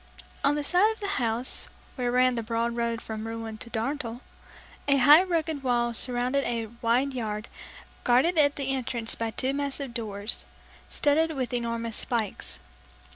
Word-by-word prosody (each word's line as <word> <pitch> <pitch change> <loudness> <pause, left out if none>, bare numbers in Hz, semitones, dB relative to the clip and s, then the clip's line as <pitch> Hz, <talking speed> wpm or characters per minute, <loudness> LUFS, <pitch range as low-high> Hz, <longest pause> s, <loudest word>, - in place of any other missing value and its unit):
On 285 - +4
the 295 - -1
side 365 +8 +4
of 445 - -8
the 405 - -3
house, 235 +2 -1 0.2
where 245 -2 -1
ran 255 +1 +4
the 235 - -1
broad 230 +1 -1
road 235 -1 -1
from 220 0 -5
Rouen 225 -1 -5
to 235 - -6
Darnetal, 235 +1 -3 0.7
a 280 -1 +5
high 290 +6 +8
rugged 325 -5 -1
wall 240 -2 +1
surrounded 250 +3 +1
a 230 -3 -2
wide 250 +4 +2
yard, 215 -3 -3 0.6
guarded 275 +8 +4
at 285 -1 +4
the 270 -1 -1
entrance 240 -3 -2
by 230 0 -2
two 260 +4 -1
massive 280 -2 -3
doors, 210 -2 -4 0.5
studded 315 +2 +2
with 255 -2 -2
enormous 230 -2 -2
spikes. 230 -5 -2
245 Hz, 160 wpm, -27 LUFS, 230-280 Hz, 0.7 s, high